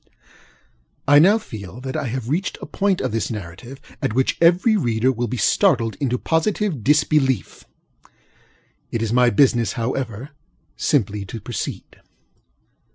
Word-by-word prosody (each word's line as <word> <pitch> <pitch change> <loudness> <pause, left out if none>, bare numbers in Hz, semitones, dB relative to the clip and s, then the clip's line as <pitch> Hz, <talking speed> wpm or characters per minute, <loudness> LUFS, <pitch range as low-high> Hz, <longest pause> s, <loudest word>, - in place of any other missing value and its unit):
I 145 +1 +7
now 195 +8 +6
feel 105 - -9
that 130 0 -5
I 140 - -2
have 120 0 -4
reached 165 +9 -2
a - - -7
point 195 -2 0
of - - -2
this 115 +1 -2
narrative 110 +5 -8 0.2
at - - -1
which 130 0 +1
every 180 +6 +4
reader 120 - +1
will 120 -1 -2
be 125 +3 -4
startled 115 - +2
into 125 -3 0
positive 165 - -1
disbelief. 145 - +1 1.2
It 115 - -2
is 115 0 -2
my 125 0 +5
business, 120 0 +2
however, 125 +1 -4 0.4
simply 105 - 0
to 115 +4 -7
proceed. 110 0 -6
125 Hz, 140 wpm, -21 LUFS, 115-150 Hz, 1.2 s, I